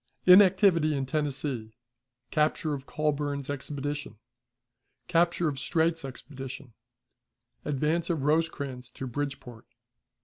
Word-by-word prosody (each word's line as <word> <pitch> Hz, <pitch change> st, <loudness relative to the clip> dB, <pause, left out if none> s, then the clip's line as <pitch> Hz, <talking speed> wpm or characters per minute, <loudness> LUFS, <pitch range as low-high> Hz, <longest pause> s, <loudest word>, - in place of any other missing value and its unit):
Inactivity 185 Hz, -4 st, +6 dB
in 135 Hz, -1 st, -1 dB
Tennessee. 135 Hz, -5 st, -2 dB, 0.6 s
Capture 155 Hz, 0 st, +1 dB
of 135 Hz, -1 st, -6 dB
Colburn's 145 Hz, -2 st, -1 dB
Expedition. 145 Hz, -1 st, -5 dB, 0.9 s
Capture 170 Hz, 0 st, +2 dB
of 140 Hz, -3 st, -2 dB
Streight's 165 Hz, +2 st, +1 dB
Expedition. 135 Hz, -1 st, -8 dB, 0.9 s
Advance 150 Hz, +4 st, 0 dB
of 160 Hz, -5 st, 0 dB
Rosecrans 145 Hz, -4 st, -1 dB
to 135 Hz, -, -7 dB
Bridgeport. 130 Hz, -3 st, -5 dB
145 Hz, 95 wpm, -28 LUFS, 135-160 Hz, 0.9 s, Inactivity